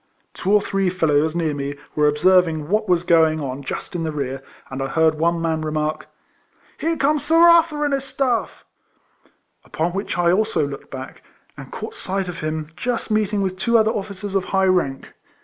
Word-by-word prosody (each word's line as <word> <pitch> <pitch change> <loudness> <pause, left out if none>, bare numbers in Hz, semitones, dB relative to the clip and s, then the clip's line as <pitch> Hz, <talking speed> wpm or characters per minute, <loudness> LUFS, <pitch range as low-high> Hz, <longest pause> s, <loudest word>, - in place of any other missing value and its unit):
Two 190 - -2
or 210 0 +5
three 195 -2 0
fellows 160 -3 +1
near 165 -3 0
me 140 0 -4 0.2
were 150 0 +3
observing 160 0 +3
what 210 0 0
was 175 -1 +3
going 160 -2 +3
on 135 -1 -4
just 140 - -6
in 175 - -3
the 160 - -2
rear, 135 -3 -4 0.3
and 130 +1 -4
I 135 - -1
heard 160 +3 +2
one 170 +1 +1
man 160 -1 -1
remark, 155 0 -2 0.4
" - - -34
Here 330 +1 -1
comes 295 +1 +1
Sir 315 +2 +1
Arthur 335 -3 +5
and 290 - 0
his 275 -1 0
staff; 265 -3 -2 0.5
" - - -39
upon 165 +2 -2
which 195 +1 -3
I 175 -1 +3
also 210 -5 +1
looked 140 -1 -9
back, 130 -1 -8 0.3
and - - -11
caught - - -6
sight 190 0 -3
of 175 -2 -6
him 155 0 -4
just 235 +4 -3
meeting 210 -1 +1
with 185 -1 -2
two 235 +4 +3
other 220 0 +3
officers 200 -1 -5
of 195 -2 0
high 190 0 +1
rank. 175 -8 0
175 Hz, 200 wpm, -21 LUFS, 155-210 Hz, 0.5 s, or